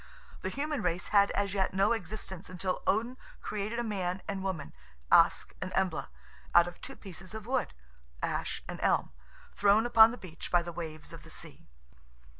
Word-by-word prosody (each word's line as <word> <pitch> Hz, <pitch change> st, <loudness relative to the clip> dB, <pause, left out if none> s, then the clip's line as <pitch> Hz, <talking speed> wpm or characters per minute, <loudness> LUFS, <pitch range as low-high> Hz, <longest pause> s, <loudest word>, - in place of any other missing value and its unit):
The -, -, -3 dB
human 295 Hz, 0 st, -2 dB
race 175 Hz, 0 st, 0 dB
had 200 Hz, -1 st, +5 dB
as 200 Hz, -1 st, 0 dB
yet 190 Hz, -2 st, 0 dB
no 195 Hz, +3 st, +4 dB
existence 195 Hz, -4 st, -4 dB
until 185 Hz, 0 st, -2 dB
Odin 230 Hz, +5 st, +1 dB, 0.2 s
created 210 Hz, +2 st, -3 dB
a 240 Hz, -, 0 dB
man 190 Hz, -4 st, -2 dB
and 195 Hz, -1 st, -3 dB
woman, 185 Hz, -7 st, -4 dB, 0.4 s
Ask -, -, +5 dB
and 185 Hz, -, -3 dB
Embla, 185 Hz, -4 st, 0 dB, 0.5 s
out 175 Hz, 0 st, +8 dB
of 175 Hz, -, -9 dB
two 270 Hz, -, -7 dB
pieces 190 Hz, 0 st, -9 dB
of 220 Hz, -1 st, -6 dB
wood 255 Hz, -, -1 dB, 0.4 s
(ash -, -, -2 dB
and -, -, -6 dB
elm), -, -, +2 dB, 0.4 s
thrown 205 Hz, +3 st, +4 dB
upon 225 Hz, -2 st, +8 dB
the 245 Hz, -, -6 dB
beach 165 Hz, -6 st, -9 dB
by 175 Hz, -1 st, +4 dB
the 175 Hz, 0 st, -6 dB
waves 155 Hz, -3 st, -7 dB
of -, -, -9 dB
the -, -, -14 dB
sea. -, -, -9 dB
195 Hz, 180 wpm, -31 LUFS, 180-220 Hz, 0.5 s, out